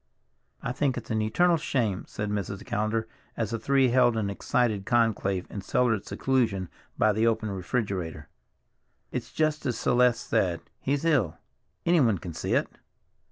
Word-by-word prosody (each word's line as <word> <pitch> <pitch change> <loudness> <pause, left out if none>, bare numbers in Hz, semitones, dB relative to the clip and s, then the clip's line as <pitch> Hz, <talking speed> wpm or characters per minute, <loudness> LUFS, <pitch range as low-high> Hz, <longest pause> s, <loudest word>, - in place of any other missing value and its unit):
"I - - -1
think 130 0 0
it's 115 -2 -6
an 110 -1 +1
eternal 170 +11 +3
shame," 115 -10 -1
said 105 0 -4
Mrs. 100 0 -3
Callender 110 +1 -1 0.3
as 110 -1 -1
the 115 - -2
three 135 +2 +3
held 120 -1 +4
an 100 -2 -1
excited 110 0 0
conclave 105 -5 +1
in 100 - -5
cellared 115 0 +1
seclusion 110 -9 0 0.3
by 110 -1 +4
the 110 +2 +2
open 110 -2 0
refrigerator. 95 -5 -3 0.8
"It's - - -4
just 155 -1 0
as 125 - -1
Celeste 125 -1 +2
says, 90 -7 +1 0.2
he's 140 +3 -1
ill—anyone 130 - +1
can 85 -1 -7
see - - -1
it. - - +2
110 Hz, 150 wpm, -27 LUFS, 100-125 Hz, 0.8 s, held